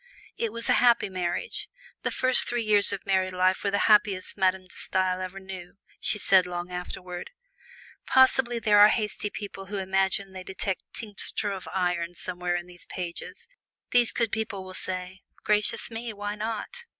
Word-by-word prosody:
It 230 -2 -2
was 230 +1 -3
a - - +5
happy 240 -4 +4
marriage. 185 - -3 0.3
The - - -1
first 255 0 +5
three 240 -1 0
years 210 -2 +5
of 195 -1 -5
married 190 -1 +1
life 185 +1 +2
were 200 - +1
the 200 - +1
happiest 205 -3 +3
Madame 190 -1 +1
De 185 - -14
Stael 185 0 -1
ever 185 +1 -6
knew, 190 -2 -9 0.2
she - - 0
said 190 -2 +5
long 175 0 -5
afterward. 180 0 -6 0.8
Possibly 260 -2 +4
there 210 -2 +4
are 205 - +10
hasty 210 -1 -1
people 195 -2 -7
who 205 +1 -4
imagine 195 0 0
they 185 -1 -7
detect 190 0 -3
tincture 205 -1 -4
of 190 -2 -6
iron 175 -2 -1
somewhere 180 0 -3
in 175 0 -3
these 175 0 -12
pages: 175 -2 -6 0.4
these 245 -2 +5
good 230 -3 0
people 220 -3 -3
will 185 0 -10
say, 185 0 -5 0.2
"Gracious 210 +2 +1
me! 230 +1 -4
why 205 0 -4
not?" 225 - -5
195 Hz, 175 wpm, -27 LUFS, 185-215 Hz, 0.8 s, are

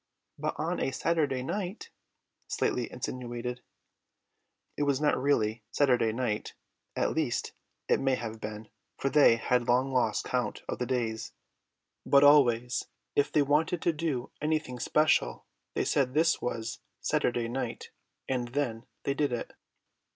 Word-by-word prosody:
"But - - -2
on - - -1
a - - 0
Saturday 135 -2 0
night," 195 - -4 0.6
Slightly - - -1
insinuated. 125 0 -4 1.1
It - - -4
was 140 -2 +2
not 150 -1 +3
really 115 -5 +1
Saturday 125 -4 +3
night, 110 -2 -2 0.4
at - - +1
least - - -1 0.3
it - - +3
may 135 -1 +2
have 115 -2 -6
been, 105 0 -6 0.3
for 135 - -1
they 145 -6 +7
had 120 +1 0
long 130 +2 +2
lost 125 -1 +1
count - - -2
of - - -3
the 125 - -1
days; 115 -3 -2 0.7
but 140 0 +5
always 125 -4 +5 0.3
if 145 - +2
they 150 - +4
wanted 155 +5 +2
to 170 - +2
do 150 -6 -2
anything 155 -5 -1
special 115 - +2 0.3
they - - +1
said 130 -1 +1
this 160 +1 +3
was 115 -1 -3 0.2
Saturday 120 -1 0
night, 130 +3 -4 0.4
and 125 -2 -1
then 120 -6 -1 0.2
they 140 - 0
did 145 -1 0
it. 120 - -4
130 Hz, 145 wpm, -29 LUFS, 120-145 Hz, 1.1 s, they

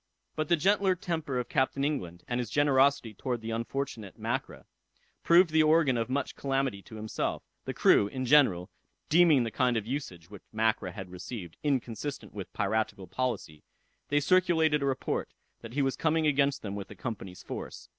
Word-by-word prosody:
But 155 -1 -2
the 170 - +5
gentle 190 +3 +2
temper 160 -7 -3
of 125 - -2
Captain 135 0 0
England, 90 - -3
and 120 -1 -1
his 120 -3 -3
generosity 140 -4 +3
towards 120 +1 -3
the 115 - -4
unfortunate 115 -2 -4
Mackra, - - -3 0.6
proved 170 0 +5
the 160 0 +5
organ 155 -4 +4
of 115 0 -1
much 140 +1 -2
calamity 135 -6 -1
to 110 - -13
himself. 110 0 -3 0.2
The - - -4
crew, 100 - +5
in 130 +4 -4
general, 120 -11 +4 0.4
deeming 160 -5 +5
the 115 - -3
kind 125 +1 +1
of 105 - -2
usage 115 - -5
which 100 - -10
Mackra 110 -4 0
had 95 -3 -8
received, 90 -1 -7
inconsistent 135 -1 -3
with 100 -4 -7
piratical 105 -2 -1
policy, 100 -11 -3 0.5
they 145 - +3
circulated 160 -2 +3
a 140 - 0
report, 135 -1 -2 0.3
that 115 0 -9
he 140 +1 +1
was 135 -1 0
coming 160 0 +1
against 140 -1 +2
them 100 -2 -4
with 100 -1 -5
the 105 - -11
Company's 95 -1 -6
force. - - -7
130 Hz, 175 wpm, -29 LUFS, 110-145 Hz, 0.6 s, the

